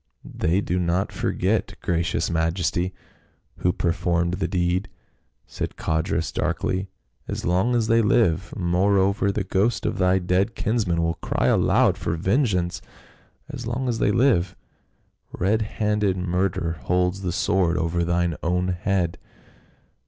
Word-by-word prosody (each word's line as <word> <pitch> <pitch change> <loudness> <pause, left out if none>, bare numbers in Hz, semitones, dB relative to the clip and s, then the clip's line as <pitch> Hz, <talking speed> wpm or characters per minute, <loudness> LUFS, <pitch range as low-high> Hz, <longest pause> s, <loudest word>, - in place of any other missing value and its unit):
" - - -42
They 85 +5 0
do 90 -2 -1
not 90 +2 0
forget, - - -1
gracious 85 +1 0
majesty, 85 +2 0 0.7
who 90 - +1
per 85 -1 0
formed 85 0 0
the 95 +1 -1
deed," 90 +1 0 0.6
said - - -5
Codrus 80 0 -1
darkly, 95 +1 -1 0.2
" - - -43
as - - -4
long 95 +8 +2
as 115 -2 +2
they 115 +1 +4
live 95 -5 +2
moreover, 100 +3 +2
the 100 0 -2
ghost 100 +4 0
of - - -1
thy 90 0 +3
dead 95 +5 0
kinsman 100 -7 0
will 85 0 -1
cry - - -1
aloud - - +3
for - - -1
vengeance! 95 - 0 0.7
as 120 -2 -7
long 125 +2 -2
as 115 -2 -1
they - - +2
live, 105 -7 +2 0.8
red 105 +5 +1
handed 105 -3 0
murder 90 -2 -1
holds 90 +3 +1
the 90 -2 -2
sword 90 -2 +1
over 85 +1 0
thine 85 -1 0
own 90 +2 0
head." 90 -1 -1
90 Hz, 145 wpm, -24 LUFS, 85-100 Hz, 0.8 s, they